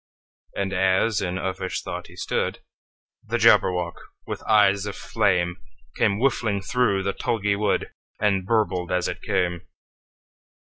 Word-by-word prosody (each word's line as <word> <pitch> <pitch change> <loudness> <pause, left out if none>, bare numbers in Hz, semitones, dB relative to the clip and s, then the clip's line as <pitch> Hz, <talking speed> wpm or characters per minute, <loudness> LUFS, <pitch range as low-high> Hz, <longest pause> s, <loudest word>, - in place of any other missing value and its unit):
And 100 -1 -2
as 95 +3 +2
in 90 -2 -2
uffish 95 0 -3
thought - - -6
he - - -15
stood, - - -2 0.6
The - - -1
Jabberwock, 90 -2 +3 0.3
with - - -5
eyes 100 -2 +4
of 100 - -5
flame, 90 -2 0 0.4
Came 100 - +2
whiffling 110 -5 +1
through 100 -2 +1
the 100 0 -1
tulgey 105 -5 0
wood, 105 0 0 0.3
And 100 -3 +2
burbled 95 -4 0
as 90 0 +1
it - - -5
came! 90 -4 -1
100 Hz, 135 wpm, -24 LUFS, 90-105 Hz, 0.6 s, eyes